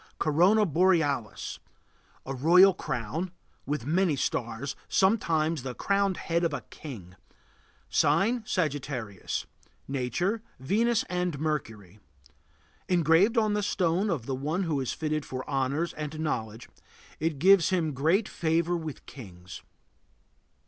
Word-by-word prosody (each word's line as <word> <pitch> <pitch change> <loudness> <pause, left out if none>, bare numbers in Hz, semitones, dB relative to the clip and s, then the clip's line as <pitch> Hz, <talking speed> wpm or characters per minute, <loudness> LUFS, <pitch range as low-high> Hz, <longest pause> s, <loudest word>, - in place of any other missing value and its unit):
CORONA 180 +8 +4
BOREALIS. 160 - +1 0.7
A 135 - -4
royal 180 +8 +6
crown, 150 - -3 0.4
with 145 -4 -2
many 170 +1 +2
stars; 120 +1 -2
sometimes 165 - +2
the 125 -1 -6
crowned 200 -2 +1
head 170 +1 -1
of 165 -4 0
a - - -5
king. 100 - -9 0.7
Sign: 195 +12 +2
Sagittarius. 140 - -3 0.4
Nature: 155 - -1 0.2
Venus 225 - +1
and 180 -3 -2
Mercury. 110 - -4 0.9
Engraved 175 - +4
on 215 -2 +3
the 210 - 0
stone 190 0 +1
of 145 - -2
one 145 +8 -1
who 160 -5 -1
is 130 -3 -2
fitted 155 -1 -2
for 130 -1 -6
honors 140 +4 -1
and 155 0 -6
knowledge, 115 -7 -3 0.5
it 160 -1 -1
gives 185 +2 +5
him 170 -5 0
great 165 - +2
favor 170 +1 0
with 160 -4 -6
kings. 95 -8 -11
155 Hz, 120 wpm, -28 LUFS, 135-180 Hz, 0.9 s, royal